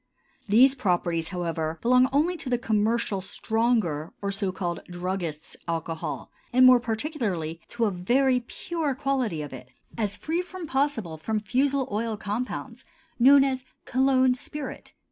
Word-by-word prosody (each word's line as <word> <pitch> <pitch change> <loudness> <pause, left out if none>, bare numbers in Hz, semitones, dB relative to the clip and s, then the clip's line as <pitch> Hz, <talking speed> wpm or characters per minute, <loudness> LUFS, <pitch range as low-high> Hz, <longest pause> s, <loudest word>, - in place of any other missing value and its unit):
These 255 +6 +6
properties, 175 -8 0
however, 165 -3 -2
belong 250 +2 +4
only 310 +6 +2
to 270 - -6
the 245 - +2
commercial 220 -3 0
stronger 215 -7 0
or 200 -1 -2
so 195 -1 -1
called 175 -2 -3
"druggists' 175 -3 -4
alcohol," 165 -1 -4 0.2
and 255 +1 +6
more 255 -1 +8
particularly 220 - -3
to 235 -1 -1
a 210 - +1
very 250 +8 +2
pure 300 +4 -3
quality 255 - -1
of 145 - -8
it, 125 -1 -10 0.3
as 205 -2 0
free 325 +3 -2
as 360 -1 -5
possible 265 - -1
from 215 +7 -1
fusel 265 +4 +1
oil 220 +1 -1
compounds, 210 - -4 0.4
known 270 +3 +8
as 260 -2 -1 0.2
cologne 260 0 +3
spirit. 270 +2 -7
225 Hz, 145 wpm, -26 LUFS, 180-260 Hz, 0.4 s, more